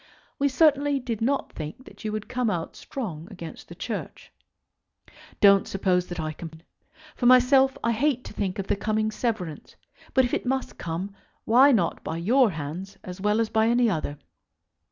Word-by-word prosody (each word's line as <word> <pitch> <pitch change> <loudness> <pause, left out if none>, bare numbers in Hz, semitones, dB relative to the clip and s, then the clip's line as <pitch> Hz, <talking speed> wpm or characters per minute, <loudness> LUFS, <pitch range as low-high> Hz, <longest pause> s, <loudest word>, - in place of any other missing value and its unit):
We 280 0 +3
certainly 285 -1 +3
did 235 -4 -4
not 275 +4 0
think 155 - -7
that - - -14
you 215 - -2
would 215 0 -4
come 250 -2 0
out 170 -4 -3
strong 175 - -6
against 170 -3 -9
the - - -9
Church. - - -6 1.1
Don't 200 -1 +6
suppose 180 -2 0
that 175 -1 -6
I 155 -1 -2
complain. 160 +1 -10 0.5
For 245 - +1
myself 265 +2 +5
I 230 - +2
hate 255 +2 +1
to - - -9
think 195 -3 -2
of 195 - -3
the - - +1
coming 215 +2 0
severance; 210 -10 -4 0.4
but 260 -1 +5
if 245 - -4
it - - 0
must 265 +1 -2
come, 175 +4 -4 0.3
why 260 +5 +6
not 185 -10 +1
by 160 - -4
your 235 +8 +4
hands 165 +4 -6
as 185 +1 -8
well 210 +2 +2
as 225 -1 +1
by 220 0 +2
any 240 -1 +3
other? 150 -4 -3
215 Hz, 180 wpm, -26 LUFS, 180-250 Hz, 1.1 s, Don't